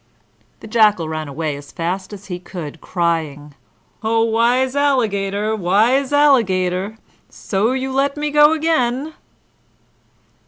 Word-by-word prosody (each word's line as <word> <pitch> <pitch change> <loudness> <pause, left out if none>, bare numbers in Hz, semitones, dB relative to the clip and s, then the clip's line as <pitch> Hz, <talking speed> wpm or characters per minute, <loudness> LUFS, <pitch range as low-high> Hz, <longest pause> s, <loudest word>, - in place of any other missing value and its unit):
The - - -10
Jackal 210 -6 +3
ran 155 -1 -4
away 150 +1 -3
as 140 0 -11
fast 185 +3 -4
as 205 -1 -10
he 180 -2 -6
could, 170 -4 -8
crying, 160 -5 -2 0.5
"O 225 +1 +1
wise 240 +4 +1
Alligator, 215 -7 0
wise 220 +9 +2
Alligator! 205 -9 +2 0.3
So 210 +5 -1
you 265 0 -3
let 275 +2 0
me 295 0 -2
go 295 +1 +6
again!" 310 -3 0
215 Hz, 120 wpm, -19 LUFS, 180-260 Hz, 0.5 s, go